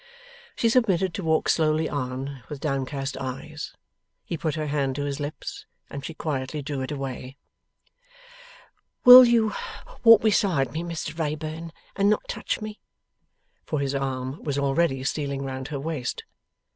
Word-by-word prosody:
She 230 - +2
submitted 195 -7 +2
to 195 - -4
walk 160 -1 +2
slowly 155 0 +2
on, 130 0 -4
with 150 - -6
downcast 135 -1 -2
eyes. 150 +4 -6 0.5
He - - -3
put 155 -1 -2
her 155 -1 -2
hand 140 -3 -1
to 145 - -2
his 140 0 -3
lips, 145 +1 -6 0.2
and 140 - -6
she 160 +2 -6
quietly 145 -1 -3
drew 140 -1 -3
it 130 - -4
away. 135 -1 -5 1.7
'Will 250 +1 +13
you 230 -3 +3 0.5
walk 230 -2 +8
beside 185 - +2
me, 160 - -3
Mr 165 -2 -5
Wrayburn, 155 +1 -3 0.2
and 200 0 +3
not 215 - +1
touch - - -3
me?' 215 0 -6 0.8
For, 155 - -2
his 140 -1 -1
arm 135 0 -3
was 145 -2 -2
already 140 -1 +1
stealing 140 0 -2
round 130 0 -5
her 145 -2 -4
waist. 150 -4 -3
150 Hz, 150 wpm, -25 LUFS, 135-165 Hz, 1.7 s, Will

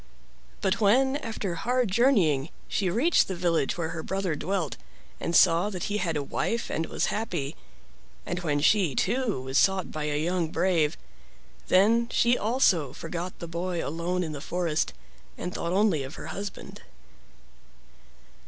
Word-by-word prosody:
But 190 +3 0
when, 265 +7 +4
after 220 -8 -4
hard 245 +4 0
journeying, 185 - +3 0.2
she 190 -3 0
reached 265 - +3
the 190 - -3
village 170 -5 0
where 165 -2 -2
her 165 -1 -4
brother 190 -1 -2
dwelt 180 0 -2 0.4
and 170 - -2
saw 170 +5 +5
that 185 -4 -5
he - - +1
had 165 -6 -1
a 145 - -2
wife 230 +10 -2
and 160 - -1
was - - -1
happy, 175 -10 -3 0.7
and 175 - -3
when 150 -5 0
she, 175 -4 +3
too, 245 - 0
was 130 +2 +1
sought 190 -1 +2
by 155 -1 -3
a 150 -1 -1
young 175 +1 0
brave, 165 -4 +1 0.7
then 225 +5 +4
she 240 0 +3
also 205 - +2
forgot 170 +3 -5
the 170 - -7
boy 170 +1 -3
alone 170 +4 -2
in 160 - -4
the 145 -2 -6
forest 170 -1 -1 0.4
and 180 - -5
thought 170 - -3
only 190 -5 +2
of 135 +3 -7
her - - -8
husband. 200 0 -7
180 Hz, 160 wpm, -27 LUFS, 160-205 Hz, 0.7 s, saw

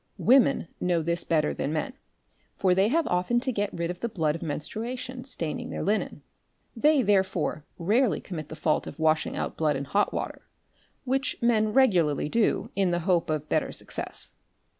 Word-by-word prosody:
Women 255 -8 +4
know 175 -2 +1
this 170 +1 -1
better 155 -2 +1
than 145 - -2
men, 160 - -2 0.6
for 185 -2 +2
they 190 +2 +3
have 320 +7 +2
often 180 +7 +1
to 260 0 0
get 205 -3 -1
rid 170 0 -2
of 180 - -8
the 235 - -2
blood 160 -7 0
of 165 - -6
menstruation 245 - -5
staining 170 - -4
their - - -4
linen; 210 +3 -1 0.5
they 290 +3 +4
therefore 190 -7 +1
rarely 210 +7 +2
commit 155 -6 -7
the - - -7
fault 155 0 0
of - - -8
washing 160 -1 +1
out - - -3
blood 155 -2 +1
in 135 +1 -3
hot 200 +9 +1
water®", - - -4 0.7
which 265 0 0
men 220 -2 +2
regularly 175 - +3
do 230 +5 +1
in 195 -2 +2
the 175 0 0
hope 175 -4 +2
of 155 -1 -2
better - - 0
success. 60 -1 -4
185 Hz, 180 wpm, -27 LUFS, 160-235 Hz, 0.7 s, Women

